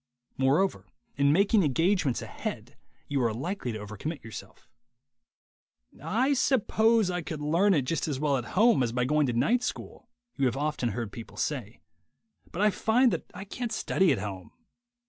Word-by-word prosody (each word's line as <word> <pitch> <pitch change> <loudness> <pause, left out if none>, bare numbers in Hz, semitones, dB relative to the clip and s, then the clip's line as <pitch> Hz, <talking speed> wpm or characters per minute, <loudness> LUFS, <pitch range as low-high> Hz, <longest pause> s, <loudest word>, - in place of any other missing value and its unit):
Moreover, 135 - +1 0.3
in 140 +1 +3
making 200 +6 +4
engagements 165 -1 +1
ahead - - -6 0.3
you 140 -2 0
are 115 -2 +2
likely 135 - -4
to - - -4
over 105 0 -8
commit 155 - -5
yourself. 110 -2 -10 1.4
"I 255 +7 +1
suppose 225 -5 +2
I 180 0 -2
could 155 -1 -6
learn 170 +7 +3
it 145 - +2
just 165 +6 -2
as 140 -4 -2
well 145 -2 +1
at 120 - -4
home 225 - +5
as 120 -2 0
by 125 +1 0
going 150 +1 +2
to 120 - -1
night 230 - +2
school," 245 - -6 0.3
you 135 -2 +2
have 125 - -2
often 145 -4 -1
heard 115 -3 -4
people 115 0 -10
say, 120 -7 -3 0.7
"but 190 - -1
I 210 - +5
find 240 +5 +3
that - - -4
I - - -6
can't 235 +3 -5
study 190 -5 +2
at 135 - +1
home." 95 -3 -6
150 Hz, 175 wpm, -28 LUFS, 125-200 Hz, 1.4 s, home